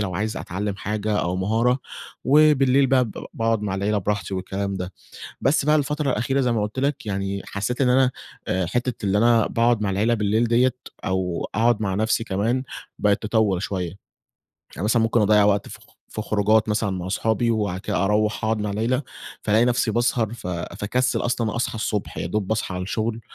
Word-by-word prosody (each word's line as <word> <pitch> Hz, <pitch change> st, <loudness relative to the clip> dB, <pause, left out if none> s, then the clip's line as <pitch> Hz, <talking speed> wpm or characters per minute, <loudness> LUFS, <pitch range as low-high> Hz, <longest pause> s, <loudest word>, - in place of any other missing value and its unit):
لو 95 Hz, -4 st, -2 dB
عايز 105 Hz, +4 st, -2 dB
أتعلم 100 Hz, +2 st, -4 dB
حاجة 105 Hz, +1 st, -2 dB
أو 90 Hz, +2 st, -1 dB
مهارة، 115 Hz, +7 st, +1 dB, 0.5 s
وبالليل 140 Hz, -1 st, +5 dB
بقى 130 Hz, -1 st, +3 dB
ب 115 Hz, -, -7 dB, 0.2 s
باقعد 115 Hz, -1 st, 0 dB
مع 95 Hz, -2 st, -2 dB
العيلة 100 Hz, +2 st, 0 dB
براحتي 100 Hz, 0 st, -2 dB
والكلام 95 Hz, +1 st, -3 dB
ده، 90 Hz, 0 st, -5 dB, 0.5 s
بس 140 Hz, +2 st, +2 dB
بقى 150 Hz, +1 st, +4 dB
الفترة 150 Hz, 0 st, 0 dB
الأخيرة، 135 Hz, +4 st, 0 dB
زي 125 Hz, -2 st, +1 dB
ما 110 Hz, -2 st, 0 dB
قلت 105 Hz, +5 st, -4 dB
لك 140 Hz, -4 st, -1 dB
يعني، 100 Hz, -1 st, -2 dB
حسّيت 105 Hz, +6 st, -3 dB
إن 130 Hz, -, +4 dB
أنا 130 Hz, 0 st, +4 dB, 0.4 s
آآ 95 Hz, -1 st, 0 dB
حتّة 120 Hz, +3 st, -2 dB
اللي 100 Hz, +1 st, +2 dB
أنا 115 Hz, -1 st, +4 dB
باقعد 115 Hz, -1 st, +2 dB
مع 100 Hz, -, 0 dB
العيلة 110 Hz, +5 st, +2 dB
بالليل 110 Hz, +2 st, +1 dB
ديًة 125 Hz, +2 st, +3 dB, 0.3 s
أو 95 Hz, -2 st, -1 dB
أقعد 115 Hz, +1 st, +2 dB
مع 95 Hz, -2 st, -1 dB
نفسي 110 Hz, +2 st, +1 dB
كمان 115 Hz, +6 st, 0 dB, 0.4 s
بقت 105 Hz, -1 st, +2 dB
تطوّل 105 Hz, -4 st, +1 dB
شويّة، 90 Hz, -4 st, -3 dB, 0.8 s
يعني 90 Hz, -, -5 dB
مثلًا 115 Hz, +2 st, +3 dB
ممكن 115 Hz, +1 st, +2 dB
أضيع 105 Hz, 0 st, +5 dB
وقت 100 Hz, -1 st, +2 dB
في -, -, -10 dB
خ -, -, -20 dB, 0.3 s
في 110 Hz, -, -3 dB
خروجات 110 Hz, +1 st, +2 dB
مثلًا 105 Hz, -1 st, 0 dB
مع 90 Hz, -1 st, -4 dB
صحابي 110 Hz, +4 st, +1 dB
وبعد 100 Hz, -5 st, -1 dB
كده 95 Hz, -1 st, -1 dB
أروّح 105 Hz, +2 st, +1 dB
أقعد 110 Hz, 0 st, +1 dB
مع 105 Hz, -, -2 dB
العيلة، 120 Hz, +6 st, 0 dB, 0.4 s
فالاقي 110 Hz, +3 st, +3 dB
نفسي 120 Hz, -2 st, +1 dB
باسهر، 120 Hz, -1 st, +1 dB
ف 115 Hz, -, -8 dB
فاكسل 105 Hz, +8 st, -1 dB
أصلًا 120 Hz, -3 st, -1 dB
أصحى 120 Hz, -, -1 dB
الصبح، 105 Hz, -2 st, -3 dB
يادوب 105 Hz, -3 st, -2 dB
باصحى 110 Hz, -3 st, -1 dB
على 90 Hz, -, -3 dB
الشغل 110 Hz, +3 st, -2 dB
110 Hz, 190 wpm, -23 LUFS, 100-120 Hz, 0.8 s, وبالليل